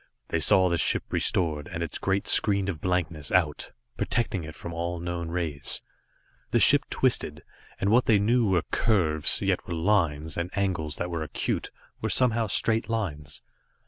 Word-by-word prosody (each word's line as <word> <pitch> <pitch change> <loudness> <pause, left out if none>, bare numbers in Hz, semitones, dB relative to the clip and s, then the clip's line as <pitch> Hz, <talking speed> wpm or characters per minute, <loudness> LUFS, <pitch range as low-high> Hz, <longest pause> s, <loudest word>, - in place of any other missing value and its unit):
They - - 0
saw 95 -1 +4
the 85 -1 0
ship - - +2
restored, 75 -5 +1
and 85 0 -3
its 85 - -5
great 95 0 -1
screen 100 -2 +3
of 80 -6 -5
blankness 85 -5 -2
out, 85 -6 0 0.3
protecting 105 -7 -1
it 80 0 -9
from 85 - -7
all 85 +1 -3
known 85 -1 -4
rays. 80 -5 -2 0.7
The - - +2
ship - - +5
twisted, - - 0 0.4
and 100 - 0
what 125 +3 +4
they 110 - +5
knew 115 +2 +2
were 90 -3 +2
curves, 80 -9 +3
yet - - -1
were 85 - -3
lines, 80 -4 0
and 85 +1 -2
angles 85 -6 -2
that 90 0 -4
were 85 -1 -3
acute, 75 -3 -3 0.3
were - - -2
somehow 115 -3 +3
straight 110 +3 +1
lines. 75 -10 -4
85 Hz, 170 wpm, -26 LUFS, 80-100 Hz, 0.7 s, ship